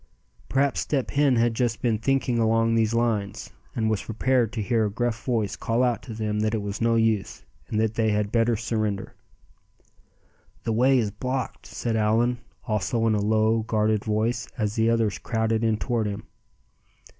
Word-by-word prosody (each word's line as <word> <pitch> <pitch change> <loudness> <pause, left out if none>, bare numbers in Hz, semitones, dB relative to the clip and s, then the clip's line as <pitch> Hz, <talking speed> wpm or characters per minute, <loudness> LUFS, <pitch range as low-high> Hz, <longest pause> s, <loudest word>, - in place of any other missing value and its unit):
Perhaps 135 0 +1
Step 135 -4 -1
Hen 140 -2 +3
had 115 0 +2
just 115 -1 0
been 115 -3 0
thinking 130 -1 +1
along 115 0 +2
these 115 0 +2
lines, 110 -4 -1 0.2
and 110 -1 0
was 110 -2 0
prepared 120 0 +1
to 115 - -3
hear 115 0 +1
a - - -5
gruff 120 +1 -2
voice 110 -5 -1
call 115 +4 0
out 120 -4 +1
to 115 - -8
them 105 -1 -2
that 110 +1 +1
it 110 - -2
was 100 +2 -5
no 115 0 +3
use, 110 -3 0 0.2
and 110 - -1
that 110 0 +1
they 110 -1 +1
had 105 -1 0
better 115 0 +2
surrender. 110 -3 -2 1.5
"The 115 - -1
way 130 +4 +4
is 110 -4 0
blocked!" 130 +4 -4
said 115 -2 -3
Allan, 115 +3 +2 0.3
also 115 +2 0
in 110 - +3
a 105 - +1
low, 110 +2 +2
guarded 110 -1 0
voice, 110 +2 -1
as 105 -3 -1
the 115 0 +2
others 115 -3 +1
crowded 110 0 0
in 110 -1 +2
toward 115 -1 -1
him. 100 -1 -5
115 Hz, 180 wpm, -25 LUFS, 110-120 Hz, 1.5 s, way